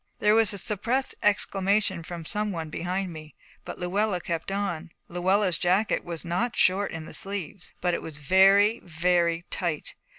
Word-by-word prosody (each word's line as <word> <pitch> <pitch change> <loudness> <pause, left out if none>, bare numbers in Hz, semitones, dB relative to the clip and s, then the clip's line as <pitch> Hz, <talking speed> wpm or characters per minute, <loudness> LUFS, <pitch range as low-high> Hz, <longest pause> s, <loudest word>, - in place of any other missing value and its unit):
There 210 - +3
was 225 -1 +4
a 200 - -3
suppressed 230 +7 -1
exclamation 200 -2 +1
from 165 0 -7
some 210 +4 -1
one 160 -4 -5
behind 180 +2 -2
me, 155 -1 -11 0.3
but - - -7
Luella 195 +2 0
kept 170 +1 -4
on. 195 -4 -2 0.2
Luella's 185 +1 +1
jacket 190 +5 +2
was 170 -3 -6
not 180 +8 -1
short 195 +2 +3
in 160 -1 -6
the - - -10
sleeves, 195 -3 -4
but 180 -1 +1
it - - -1
was 160 -2 -8
very 195 +8 +5
very 170 0 +1
tight. 170 -4 -2
185 Hz, 165 wpm, -26 LUFS, 170-205 Hz, 0.3 s, very